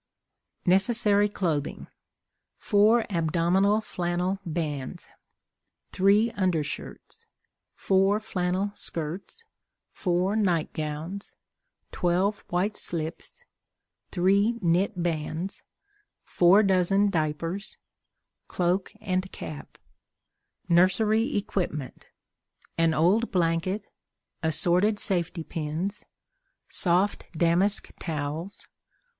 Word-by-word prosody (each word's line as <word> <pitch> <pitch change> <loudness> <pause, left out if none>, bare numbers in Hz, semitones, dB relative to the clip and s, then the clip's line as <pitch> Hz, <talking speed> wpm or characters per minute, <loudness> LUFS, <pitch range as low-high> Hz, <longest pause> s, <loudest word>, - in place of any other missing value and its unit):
Necessary 205 +2 +4
Clothing. 160 -8 -2 0.7
4 220 +2 +3
Abdominal 175 +5 +2
Flannel 180 -1 -2
Bands. 155 -6 -4 0.8
3 205 +4 +3
Undershirts. 180 -9 -3 0.5
4 195 +2 +2
flannel 185 -1 -2
Skirts. 170 - -4 0.5
4 180 +2 0
Night 180 -7 +1
Gowns. 155 +6 -5 0.6
12 185 +4 +1
White 190 +4 0
Slips. 170 - -6 0.6
3 200 +5 +2
Knit 180 0 +1
Bands. 165 +2 -3 0.6
4 185 +4 +5
Dozen 195 +1 +3
Diapers. 165 +4 -2 0.7
Cloak 180 +2 0
and 185 -3 -2
Cap. 150 - -9 0.9
Nursery 210 +7 +3
Equipment. 170 -9 -3 0.7
An 165 -1 +2
old 195 +9 +3
Blanket. 180 +3 0 0.6
Assorted 175 +6 +3
Safety 175 -4 -1
Pins. 165 +5 -4 0.6
Soft 185 +3 +1
Damask 175 +5 +2
Towels. 160 +3 -4
185 Hz, 75 wpm, -26 LUFS, 165-200 Hz, 0.9 s, 4